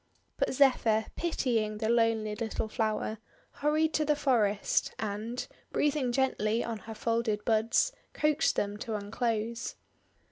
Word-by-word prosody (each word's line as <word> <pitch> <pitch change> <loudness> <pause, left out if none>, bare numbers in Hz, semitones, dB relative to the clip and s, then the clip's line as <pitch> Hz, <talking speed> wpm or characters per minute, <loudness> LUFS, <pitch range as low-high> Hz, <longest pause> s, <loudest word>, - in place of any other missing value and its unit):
But - - +1
Zephyr, 235 -5 +4
pitying 230 -10 0
the 220 0 -1
lonely 225 -2 +2
little 220 0 -3
flower, 215 0 -1 0.3
hurried 310 +2 +1
to 305 - +2
the 300 0 +2
forest, 220 -8 +1
and, 220 +3 -3 0.3
breathing 290 -4 +1
gently 240 -4 +1
on 230 -2 -4
her 225 0 -9
folded 230 -2 -1
buds, 225 - +3 0.2
coaxed 305 +1 +2
them 205 0 -1
to 225 0 -4
unclose. 225 +2 -2
230 Hz, 130 wpm, -30 LUFS, 215-260 Hz, 0.3 s, Zephyr